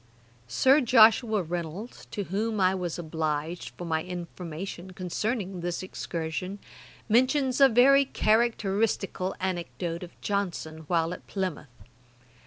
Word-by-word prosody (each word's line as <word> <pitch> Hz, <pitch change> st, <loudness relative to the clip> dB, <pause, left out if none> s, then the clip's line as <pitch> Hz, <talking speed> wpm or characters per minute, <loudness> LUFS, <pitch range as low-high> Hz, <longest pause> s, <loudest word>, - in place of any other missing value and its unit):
] 120 Hz, -1 st, -31 dB
Sir 265 Hz, -, +4 dB
Joshua 225 Hz, -3 st, +5 dB
Reynolds, 175 Hz, +6 st, -6 dB
to 205 Hz, -, -3 dB
whom 215 Hz, +3 st, -2 dB
I 185 Hz, 0 st, +4 dB
was 180 Hz, -3 st, -3 dB
obliged 160 Hz, 0 st, -3 dB
for 175 Hz, -, -6 dB
my 160 Hz, -1 st, 0 dB
information 180 Hz, +1 st, -7 dB
concerning 190 Hz, +1 st, -3 dB
this 175 Hz, +1 st, -3 dB
excursion, 180 Hz, +1 st, -4 dB, 0.5 s
mentions 255 Hz, +3 st, +2 dB
a 275 Hz, -, +9 dB
very 275 Hz, +4 st, +6 dB
characteristical 215 Hz, -5 st, +1 dB
anecdote 175 Hz, -2 st, -3 dB
of 175 Hz, -1 st, -11 dB
Johnson 170 Hz, -6 st, -3 dB
while 165 Hz, 0 st, +1 dB
at -, -, -11 dB
Plymouth. 185 Hz, -6 st, -3 dB
185 Hz, 120 wpm, -27 LUFS, 170-220 Hz, 0.5 s, a